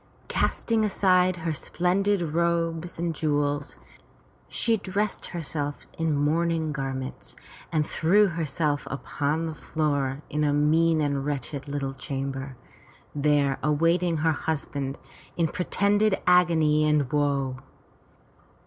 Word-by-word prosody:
Casting 225 -2 +1
aside 185 -3 +3
her 165 -2 -2
splendid 185 +5 0
robes 170 0 0
and 170 0 -1
jewels, 145 -2 -1 0.7
she 230 -1 +1
dressed 205 0 -2
herself 150 -4 -4
in 160 -2 0
mourning 160 +2 +1
garments 135 -2 -5 0.4
and 155 -2 +1
threw 190 +8 +3
her 165 -1 -3
self 145 0 -1
upon 145 +3 -2
the 160 - -3
floor 145 -3 -1
in 150 +1 -1
a 145 -1 +2
mean 155 +2 +3
and 140 -2 0
wretched 140 0 -3
little 140 -1 -3
chamber, 135 -1 -5 0.6
there 145 -2 +2
awaiting 165 +3 +2
her 160 +1 +2
husband 140 -3 -3 0.4
in 170 -2 +2
pretended 200 +4 +1
agony 160 -4 +4
and 150 -4 +2
woe. 140 -3 0
155 Hz, 115 wpm, -26 LUFS, 145-170 Hz, 0.7 s, agony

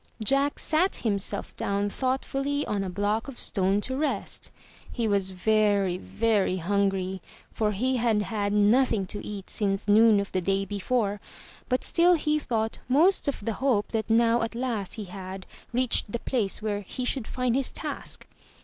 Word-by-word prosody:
Jack 275 +5 +3
sat 335 +5 +2
himself 200 -5 -2
down 200 +1 -1
thoughtfully 270 +4 -1
on 200 -2 -1
a. 190 - -3
block 205 +5 -1
of 270 -3 -8
stone 195 0 +1
to 260 +4 -1
rest. 295 +2 -2 0.4
He 235 -2 -1
was 200 -2 +2
very, 200 -1 +2
very 210 -5 +1
hungry, 190 0 0 0.3
for 215 -1 0
he 255 +6 0
had 225 -3 +2
had 205 -1 -2
nothing 210 +1 +3
to 205 +3 -6
eat 200 -2 -7
since 195 -1 -1
noon 215 0 +6
of 200 - -4
the 185 - 0
day 195 +2 0
before, 205 +1 -1 0.5
but 255 0 +1
still 350 +1 +4
he 305 -1 +1
thought 225 -5 -2
most 325 +7 +3
of 270 -7 -2
the 225 - 0
hope 240 -7 +2
that 220 -1 -2
now 230 +1 +4
at 230 0 -3
last 235 -6 -3
he 215 - -5
had 190 0 -8 0.3
reached 245 -3 +2
the 235 - -1
place 225 -5 -2
where 205 -1 -1
he 250 +6 -5
should 250 -2 0
find 250 -2 0
his 270 0 0
task. - - -5
215 Hz, 170 wpm, -27 LUFS, 200-255 Hz, 0.5 s, noon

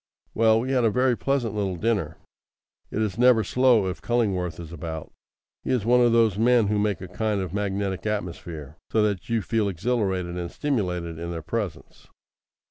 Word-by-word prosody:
Well, 110 0 +4
we 130 +2 -3
had 130 -2 +2
a 115 - +4
very 125 +2 +2
pleasant 130 -4 -1
little 100 -3 -1
dinner. 110 +3 -1 0.7
It 110 - -1
is 105 +1 -3
never 125 -3 +5
slow 125 -1 +3
if 90 0 -4
Cullingworth 95 -9 0
is 85 -2 -8
about. 80 -1 -6 0.5
He - - -5
is 125 -5 +1
one 125 +1 +5
of 120 -1 +4
those 115 -4 +3
men 115 -2 +4
who 105 0 +1
make 105 -4 0
a 95 - -6
kind 105 +2 -1
of 95 -2 -4
magnetic 100 -1 -2
atmosphere, 85 -7 -5
so 110 - +3
that 100 -3 -1
you 115 -3 0
feel 110 -1 0
exhilarated 95 -3 -1
and 85 -1 -4
stimulated 90 - -2
in 85 0 -5
their 85 -2 -5
presence. 105 +4 -5
105 Hz, 185 wpm, -25 LUFS, 90-115 Hz, 0.7 s, never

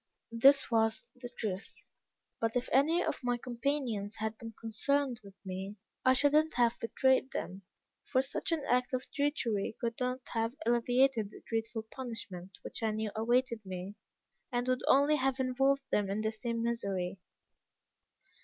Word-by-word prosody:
This 270 +4 +5
was 225 -1 +2
the 245 -1 -8
truth; 210 -5 -6 0.5
but 225 +1 0
if 245 0 0
any 320 +7 +4
of - - -2
my 245 0 +1
companions 235 -4 -2
had 220 +1 -2
been 225 -1 -8
concerned 250 +3 0
with 195 -1 -13
me, 190 +2 -5 0.3
I 260 - +6
should 285 +2 +3
not 310 +1 +3
have 240 -1 +3
betrayed 260 +3 +2
them; 190 -6 -5 0.4
for 260 -1 +2
such 270 - -3
an 320 -3 0
act 250 +1 +1
of 255 - -3
treachery 240 -9 0
could 230 -1 -2
not 250 0 -1
have 225 +1 0
alleviated 240 -1 +3
the - - -14
dreadful 225 0 -2
punishment 210 -6 -7
which - - -6
I 225 - +1
knew 215 0 -2
awaited 235 +1 +1
me, 185 +1 -6 0.6
and 245 0 -1
would 255 0 +1
only 285 +3 +5
have 270 0 0
involved 270 +2 +2
them 205 -2 +2
in 200 +2 -1
the 220 0 0
same 230 +1 -3
misery. 195 -6 -1
235 Hz, 160 wpm, -32 LUFS, 220-260 Hz, 0.6 s, I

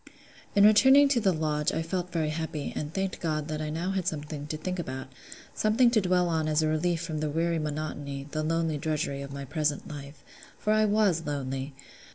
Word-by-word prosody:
In 200 - +6
returning 265 +7 +7
to 265 -4 +3
the 200 -4 +3
Lodge 155 -2 0
I 160 - -1
felt 180 +1 -3
very 160 -2 0
happy, 160 -2 -4
and 150 0 -3
thanked 190 +1 -2
God 155 -2 -2
that 155 0 -3
I - - -2
had 150 - -4
now 180 +4 -1
something 150 -3 -4
to 155 - -3
think 180 +4 -4
about; 130 -4 -5 0.4
something 230 +3 +3
to 220 -3 +3
dwell 180 -1 +2
on 160 -2 0
as 155 0 +2
a - - +2
relief 165 +2 0
from 160 -2 -3
the 155 0 -1
weary 165 +2 0
monotony, 145 -2 -4
the 155 - -1
lonely 160 -1 0
drudgery, 150 -3 -2
of 140 0 -7
my 140 0 -6
present 150 +1 -1
life: 145 0 -9 0.3
for 215 - +1
I 215 0 +4
was 205 -6 +2
lonely. 135 -1 -3
155 Hz, 210 wpm, -28 LUFS, 150-180 Hz, 0.4 s, returning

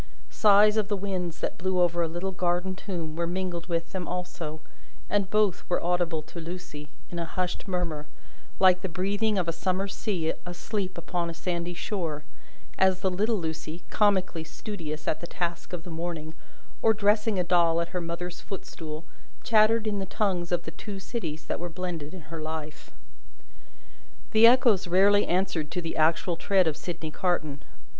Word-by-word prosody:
Sighs 210 0 +6
of 215 -2 +2
the 205 -1 0
winds 185 -4 -3
that 210 - -2
blew 185 0 +1
over 175 -1 +3
a 165 - +2
little 175 +4 -3
garden 180 0 0
tomb 170 -5 -5
were 170 0 -1
mingled 175 -1 -3
with 170 -1 -1
them 185 -2 -3
also, 170 -3 -4 0.5
and 200 -2 +2
both 210 -4 +2
were 175 - +2
audible 175 -2 +1
to 170 - -9
Lucie, 165 -3 -7 0.2
in 175 - -3
a 170 - -1
hushed 180 +4 -3
murmur 170 -5 -2 0.5
like 185 -1 +6
the 190 - -2
breathing 200 +5 0
of 180 -3 +1
a 165 - +1
summer 185 +3 0
sea 190 -5 -1
asleep 185 +2 -3
upon 170 0 -2
a 165 - -6
sandy 175 0 -2
shore 170 -5 -3 0.6
as 190 -1 +4
the 190 - +2
little 215 +5 +1
Lucie, 160 -2 -4
comically 190 -6 +2
studious 160 -3 -6
at - - +1
the 170 - -6
task 170 -1 -3
of 175 -2 -4
the 175 - -8
morning, 160 -1 -4 0.5
or 220 0 +5
dressing 210 0 +3
a 180 - +2
doll 170 -1 +4
at 170 0 -1
her 180 -1 -2
mother's 170 +1 -4
footstool, 165 -5 -6 0.4
chattered 220 0 +4
in 210 -2 0
the 190 - -3
tongues 180 -4 0
of 175 -1 +1
the - - -6
Two 205 -2 -7
Cities 165 -8 -4
that - - -2
were 175 +1 -3
blended 170 -4 -4
in 185 - -8
her 155 +1 -7
life. 155 -1 -5 1.4
The 220 0 +8
Echoes 235 -6 +5
rarely 200 +3 +5
answered 180 -4 0
to 180 - -2
the 165 -2 -4
actual 165 +2 +2
tread 190 0 +3
of 160 -2 +1
Sydney 160 -1 -5
Carton. 155 -5 -1
180 Hz, 180 wpm, -28 LUFS, 165-195 Hz, 1.4 s, The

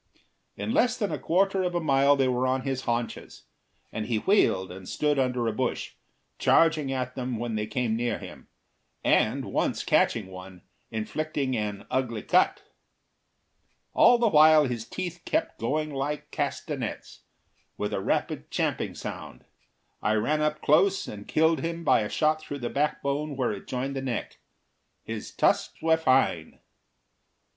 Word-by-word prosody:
In 225 - -3
less 250 -1 +2
than 205 -4 -1
a - - -3
quarter 195 +3 +2
of 180 -1 -1
a - - +2
mile 140 -2 +4
they 135 -2 +2
were 130 0 +1
on 130 +1 +1
his 135 -1 -3
haunches, 120 -1 -3 0.5
and 110 -1 -4
he 115 -2 0
wheeled 100 - +2
and 95 0 -9
stood 150 -2 +1
under 125 -2 0
a - - +1
bush, 130 +2 -2 0.5
charging 160 -4 +3
at 130 -1 -2
them 125 -2 -3
when 120 0 -3
they 105 -1 -2
came 110 0 -1
near 120 -1 -1
him, - - -11 0.6
and - - +2
once - - -1
catching 110 -4 +2
one, 95 -1 -11 0.3
inflicting 135 +4 -2
an 105 -2 -3
ugly 120 -4 -1
cut. - - +2 1.3
All 245 +1 +6
the 235 -1 +2
while 155 -2 +7
his 120 -3 -3
teeth 175 -2 -5
kept 315 +1 -1
going 150 +6 -1
like 140 +2 -3
castanets, - - -4 0.6
with - - -3
a - - -1
rapid - - -2
champing - - -1
sound. - - -8 0.6
I 105 - +1
ran 150 +8 +1
up 150 0 -1
close 185 +6 +3
and 105 -1 -8
killed 160 0 +3
him 165 +3 -4
by 130 -6 +4
a 105 -1 -2
shot 155 0 +1
through 145 -2 -6
the 120 - -3
backbone 145 0 -1
where 125 -3 0
it 100 -2 -7
joined 135 +2 -3
the 135 - -2
neck. 130 -3 -4 0.6
His - - -6
tusks - - +1
were 160 0 +3
fine. 130 - +1
135 Hz, 160 wpm, -27 LUFS, 115-155 Hz, 1.3 s, while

